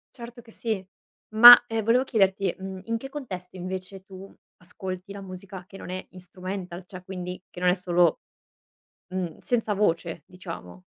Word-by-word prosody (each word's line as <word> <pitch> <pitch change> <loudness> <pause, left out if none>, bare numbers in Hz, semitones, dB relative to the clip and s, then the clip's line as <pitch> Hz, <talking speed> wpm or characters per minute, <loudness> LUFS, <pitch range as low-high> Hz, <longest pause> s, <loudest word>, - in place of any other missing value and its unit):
Certo 240 0 -10
che 225 - -18
sì. 220 -4 -3 0.5
Ma, 240 +2 +12
ehm, 225 -1 -2
volevo 235 +4 +3
chiederti, 195 -6 +1
mhmm, 190 0 -7
in 230 0 -1
che 270 +4 -8
contesto 190 -12 -7
invece 185 +1 -6
tu 190 0 -12 0.2
ascolti 185 0 -7
la 200 - -8
musica 185 0 -9
che 195 - -12
non - - -9
è 185 0 -5
instrumental, 185 0 -7
cioè 185 0 -11
quindi 180 -1 -6
che - - -10
non 180 0 +3
è 180 - +3
solo 175 -3 +2 0.9
mhmm, 180 -4 -3
senza 230 -3 -1
voce 170 -4 0
diciamo? 165 - -10
190 Hz, 165 wpm, -26 LUFS, 180-210 Hz, 0.9 s, Ma